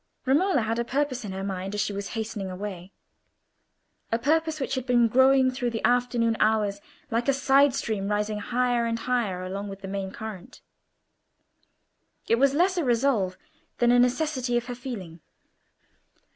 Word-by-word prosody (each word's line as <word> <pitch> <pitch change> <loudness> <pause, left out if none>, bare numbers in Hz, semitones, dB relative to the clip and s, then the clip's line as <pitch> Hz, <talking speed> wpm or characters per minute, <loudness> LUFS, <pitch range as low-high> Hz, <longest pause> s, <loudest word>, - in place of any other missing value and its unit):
Romola 295 +3 +3
had 225 +1 -1
a - - +1
purpose 265 0 -1
in 205 - -5
her 190 0 -5
mind 195 0 -4
as 205 - 0
she 205 - -2
was 200 0 -4
hastening 215 -3 -4
away; 185 -1 -7 1.2
a 230 - +2
purpose 315 +5 +1
which 270 - -2
had 260 -1 -3
been 240 -2 +4
growing 260 +2 +4
through 250 -1 -2
the 225 -1 -2
afternoon 240 -2 +1
hours 210 -2 +1 0.3
like 230 +2 0
a 275 - +4
side 275 0 +4
stream, 205 -3 -2
rising 210 0 -1
higher 245 +1 0
and 230 0 -1
higher 230 -7 -1
along 200 +2 -5
with 195 0 -9
the 195 - -6
main 195 0 -3
current. 205 -2 -9 1.7
It 230 - +3
was 275 +1 +3
less 365 +4 +2
a 345 - +1
resolve 235 -7 +1 0.4
than 240 0 +3
a 245 - +5
necessity 255 -1 +1
of 240 - -2
her 245 - -5
feeling. 220 -10 -7
235 Hz, 170 wpm, -26 LUFS, 205-260 Hz, 1.7 s, a